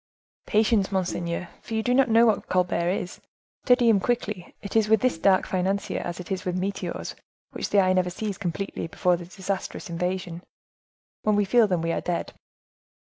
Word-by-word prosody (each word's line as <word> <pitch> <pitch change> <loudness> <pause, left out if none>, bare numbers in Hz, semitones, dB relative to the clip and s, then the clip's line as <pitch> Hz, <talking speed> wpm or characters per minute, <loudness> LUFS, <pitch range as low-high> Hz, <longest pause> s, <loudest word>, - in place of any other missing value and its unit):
"Patience, 210 -2 +2
monseigneur; 175 -2 -2
for 225 - -6
you 220 - 0
do 245 - +1
not 265 -1 +4
know 230 +1 +6
what 220 -3 +1
Colbert 180 -1 +1
is—study 240 +6 -1
him 220 -3 +5
quickly; 210 -4 -2
it 200 - -7
is 220 -1 +3
with 220 -1 +4
this 255 -10 +1
dark 190 +2 +4
financier 190 +2 -1
as 175 0 -5
it 180 - -8
is 190 -1 -2
with 180 0 -2
meteors, 195 +2 -3 0.4
which - - -4
the 205 - +4
eye 185 -1 +4
never 185 -1 +2
sees 200 +2 -4
completely 195 -1 -3
before 180 +2 +1
their 170 0 -8
disastrous 190 -1 -5
invasion; 180 0 -3 0.8
when 215 -1 +2
we 205 0 +2
feel 230 +2 +4
them 180 -4 0
we 165 - 0
are - - -1
dead." 175 -1 -3
190 Hz, 185 wpm, -25 LUFS, 180-215 Hz, 0.8 s, know